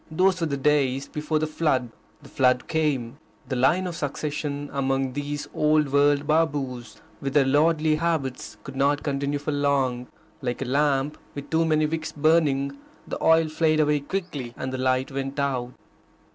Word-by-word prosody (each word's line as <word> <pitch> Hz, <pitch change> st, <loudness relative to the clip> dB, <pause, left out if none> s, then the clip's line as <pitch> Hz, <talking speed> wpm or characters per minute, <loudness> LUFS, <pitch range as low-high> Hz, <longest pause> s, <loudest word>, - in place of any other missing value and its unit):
Those 180 Hz, +3 st, +2 dB
were 165 Hz, -, +1 dB
the 140 Hz, -2 st, -2 dB
days 135 Hz, -1 st, +1 dB
before 150 Hz, +1 st, -2 dB
the 155 Hz, -, 0 dB
flood. 150 Hz, -6 st, 0 dB, 0.3 s
The -, -, -13 dB
flood 125 Hz, -1 st, +2 dB
came. 145 Hz, -5 st, -1 dB, 0.3 s
The 130 Hz, -, -2 dB
line 145 Hz, +9 st, +3 dB
of 175 Hz, -2 st, -4 dB
succession 145 Hz, -1 st, -3 dB
among 135 Hz, -1 st, 0 dB
these 145 Hz, +1 st, -4 dB
old 150 Hz, -1 st, +2 dB
world 145 Hz, 0 st, +3 dB
Babus, 140 Hz, -6 st, -1 dB, 0.2 s
with 140 Hz, 0 st, -3 dB
their 145 Hz, -2 st, +5 dB
lordly 155 Hz, +2 st, +3 dB
habits, 155 Hz, -6 st, -2 dB
could 135 Hz, -, -9 dB
not 140 Hz, +1 st, +1 dB
continue 140 Hz, 0 st, -1 dB
for 145 Hz, +2 st, -3 dB
long. 135 Hz, -4 st, 0 dB, 0.3 s
Like 125 Hz, 0 st, -2 dB
a -, -, -5 dB
lamp 140 Hz, +1 st, +1 dB, 0.2 s
with 140 Hz, -1 st, -8 dB
too 165 Hz, +1 st, +3 dB
many 155 Hz, -1 st, +2 dB
wicks 155 Hz, 0 st, -3 dB
burning, 145 Hz, -3 st, +2 dB, 0.3 s
the -, -, -5 dB
oil 160 Hz, 0 st, +5 dB
flared 155 Hz, 0 st, +1 dB
away 150 Hz, -1 st, +2 dB
quickly, 145 Hz, -6 st, -5 dB
and 130 Hz, 0 st, -4 dB
the 130 Hz, -, -3 dB
light 130 Hz, +1 st, +1 dB
went 135 Hz, +1 st, -4 dB
out. 130 Hz, -3 st, -1 dB
145 Hz, 170 wpm, -25 LUFS, 135-155 Hz, 0.3 s, their